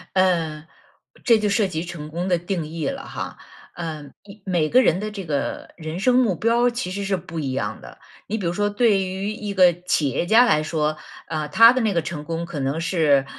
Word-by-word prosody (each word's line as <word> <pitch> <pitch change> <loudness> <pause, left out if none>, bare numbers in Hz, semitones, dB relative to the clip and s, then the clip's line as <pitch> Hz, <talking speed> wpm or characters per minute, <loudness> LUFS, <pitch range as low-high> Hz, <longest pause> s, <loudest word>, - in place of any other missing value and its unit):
嗯， 165 -5 +1 0.6
这 230 -3 +5
就 210 -1 0
涉 200 0 +2
及 165 -2 -3
成 165 -4 -7
功 175 +4 -3
的 175 -2 +2
定 175 -1 -3
义 160 0 -4
了 275 0 -4
哈， - - -6 0.4
呃 160 -3 -5 0.4
每 175 -5 +1
个 255 +10 +5
人 180 -6 +2
的 215 +1 -3
这 200 -3 -7
个 145 -3 -3
人 160 +2 -5
生 250 +2 +3
目 225 -8 +2
标 235 +6 +2
其 235 -7 -4
实 200 +1 -3
是 195 0 +1
不 165 -1 -6
一 135 -3 -2
样 110 -5 -3
的。 - - -13 0.3
你 220 - -2
比 190 - -4
如 170 - +1
说 205 +3 0
对 205 -2 +3
于 190 +3 -3
一 210 -2 -5
个 180 -2 +6
企 150 -5 +1
业 135 - -1
家 225 +7 +6
来 155 -9 +2
说， 155 -1 -1 0.3
呃， 155 -2 -3
他 230 +10 +7
的 255 - 0
那 215 -3 +1
个 170 - +1
成 155 -2 -6
功 165 +1 -3
可 160 -4 -6
能 135 +5 -1
是， 155 -6 +2
175 Hz, 240 characters per minute, -22 LUFS, 155-205 Hz, 0.6 s, 他